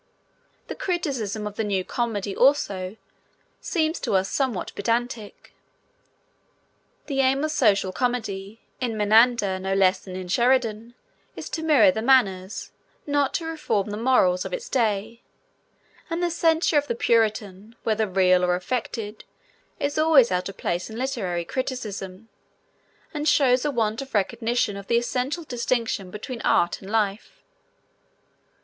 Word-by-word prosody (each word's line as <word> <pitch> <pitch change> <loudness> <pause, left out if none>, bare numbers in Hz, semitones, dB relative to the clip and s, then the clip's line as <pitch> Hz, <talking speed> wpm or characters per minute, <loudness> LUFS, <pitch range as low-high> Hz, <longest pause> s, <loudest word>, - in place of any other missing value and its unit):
The - - -6
criticism 260 - -2
of 210 0 -6
the 220 - 0
new 195 -3 0
comedy, 210 -5 -2
also, 205 -8 +1 0.6
seems 320 -2 -1
to - - -1
us 190 0 +1
somewhat 260 -9 -1
pedantic. 230 0 -3 1.5
The 275 -2 -3
aim 270 +2 +2
of 310 - 0
social 205 -9 +2
comedy, 220 -3 -3 0.2
in 235 -4 -2
Menander 215 -2 +4
no 190 +1 -1
less 190 -1 +3
than 185 -2 -9
in 185 -1 -6
Sheridan, 235 +1 +1 0.4
is - - -8
to 320 - -3
mirror 305 -2 +5
the 220 - -3
manners, 210 -7 +2 0.3
not 285 -2 +1
to 330 - -2
reform 300 -11 -2
the - - -3
morals, 210 -6 +2
of - - -6
its - - -5
day, 225 -1 -1 0.9
and 335 +2 -2
the 345 - +1
censure 325 -2 +3
of 290 - -6
the 235 - -1
Puritan, 215 -2 0
whether 220 -1 +1
real 185 -1 +3
or 180 0 +2
affected, 215 +2 -4 0.6
is 285 +2 -1
always 310 -8 +5
out 180 +1 -1
of 195 - -10
place 175 +3 -2
in 220 - -8
literary 210 -10 -2
criticism, 215 -5 -5 0.9
and 300 0 0
shows 260 -3 +3
a - - +2
want 225 -4 -1
of 270 -3 -8
recognition 225 +1 0
of 200 -1 -9
the 235 - +3
essential 255 +7 -2
distinction 235 -7 -2
between 230 +5 -7
art 175 - +2
and 195 - -10
life. 210 -2 -2
225 Hz, 145 wpm, -24 LUFS, 195-265 Hz, 1.5 s, mirror